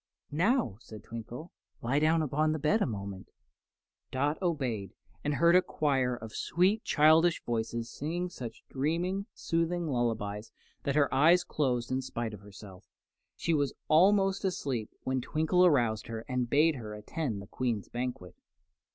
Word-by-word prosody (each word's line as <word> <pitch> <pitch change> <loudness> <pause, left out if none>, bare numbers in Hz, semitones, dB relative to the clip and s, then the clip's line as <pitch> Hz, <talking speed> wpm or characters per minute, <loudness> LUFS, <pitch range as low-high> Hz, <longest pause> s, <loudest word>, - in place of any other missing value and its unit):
"Now," 170 - +1
said 110 -3 -11
Twinkle, 120 +8 -8 0.3
"lie 130 +5 +2
down 160 +1 +3
upon 155 +2 +1
the - - -1
bed 155 +9 +2
a - - +2
moment." 100 -4 -6 0.8
Dot 145 +6 -1
obeyed, 130 - -2 0.3
and 145 0 0
heard 170 +3 +5
a 180 - +7
chorus 135 -7 0
of 110 - -7
sweet, 195 +5 +1
childish 160 +3 +4
voices 115 0 -2
singing 170 +5 -3
such 125 -10 -8
dreamy, 175 +8 -1
soothing 170 +1 -1
lullabies 115 -6 -2 0.3
that 140 - 0
her 145 -2 +3
eyes 165 +7 +5
closed 125 -5 -1
in 130 +1 0
spite 120 -3 -4
of 105 - -8
herself, 100 -1 -13
and - - -47
she 170 - +1
was 145 -3 0
almost 195 +4 +4
asleep 135 - -2
when 130 0 -1
Twinkle 160 +7 +2
aroused 120 -9 +2
her 115 -1 -5
and 125 -2 -1
bade 150 +2 +4
her 105 -3 -7
attend 110 +1 -3
the 100 - -8
Queen's 115 -1 -2
banquet. 120 -8 -5
140 Hz, 155 wpm, -30 LUFS, 115-165 Hz, 0.8 s, a